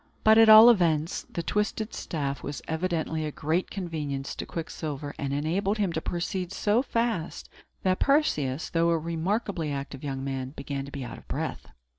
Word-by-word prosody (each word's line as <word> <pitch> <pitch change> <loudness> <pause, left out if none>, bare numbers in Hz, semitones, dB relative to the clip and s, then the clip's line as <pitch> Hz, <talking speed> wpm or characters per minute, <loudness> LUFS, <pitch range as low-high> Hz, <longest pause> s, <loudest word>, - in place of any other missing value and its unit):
But, 220 +1 +7
at 225 -1 +7
all 220 +2 +11
events, 165 -6 +1
the 170 - -3
twisted 210 +3 -1
staff 140 -4 -3
was 145 0 -6
evidently 160 -1 -1
a 155 - -3
great 160 +5 -1
convenience 150 -8 -4
to - - -5
Quicksilver, 150 -3 -5
and 140 -1 -2
enabled 175 +9 0
him 200 -5 0
to 160 - -2
proceed 180 +2 -3
so 210 +4 +2
fast, 230 - -2 0.3
that 185 -1 +2
Perseus, 155 - +1
though 165 0 +2
a 165 - +3
remarkably 170 +1 -2
active 140 0 -5
young 135 -2 -3
man, 135 -1 -4
began 140 -1 -4
to 140 - -10
be 140 -2 -5
out - - -8
of - - -21
breath. - - -4
165 Hz, 175 wpm, -27 LUFS, 145-195 Hz, 0.3 s, all